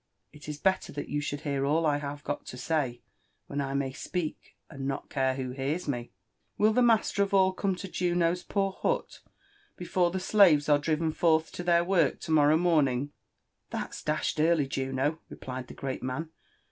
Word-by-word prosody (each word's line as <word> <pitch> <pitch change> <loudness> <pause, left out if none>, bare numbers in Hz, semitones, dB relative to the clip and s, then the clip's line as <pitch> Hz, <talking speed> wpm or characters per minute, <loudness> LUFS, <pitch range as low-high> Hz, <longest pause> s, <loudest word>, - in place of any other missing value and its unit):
" - - -49
It 150 0 -11
is 150 -1 -5
belter 190 +1 +1
that 145 - -5
you 145 0 -1
should 145 0 -4
hear 140 -2 -1
all 155 +4 +2
I 145 -2 +2
have 145 0 -6
got 145 - -4
to 125 - -7
say 130 -5 -1 0.4
when 145 0 -3
I 135 0 -3
may 140 -1 -1
speak 170 +2 -5
and 135 -3 -6
not 135 - -4
care 130 -2 +1
who 130 -1 -4
hears 140 +7 -3
me. 120 -4 -3 0.5
Will 215 +1 +4
the 250 - +3
master 225 -4 +3
of 200 0 +1
all 190 -1 +4
come 195 0 -1
to 195 +2 -7
Juno's 175 -1 0
poor 195 0 -1
hut - - -2 0.6
before 180 0 +1
the 190 +2 -3
slaves 185 -7 +5
are 145 -1 +5
driven 160 +2 0
forth 160 0 +2
to - - -6
their 170 -1 +4
work 175 -5 +2
to - - -5
morrow 150 0 +5
morning 145 -6 +2 0.2
?" - - -52
\ - - -52
" - - -51
That's - - -5
d 150 - +1
tion 155 - +1
early, 160 -4 +3
Juno," 135 +3 -1
replied 130 -1 -7
the - - -11
great 135 -1 -4
man. 140 +6 -4
155 Hz, 210 wpm, -29 LUFS, 140-175 Hz, 0.6 s, slaves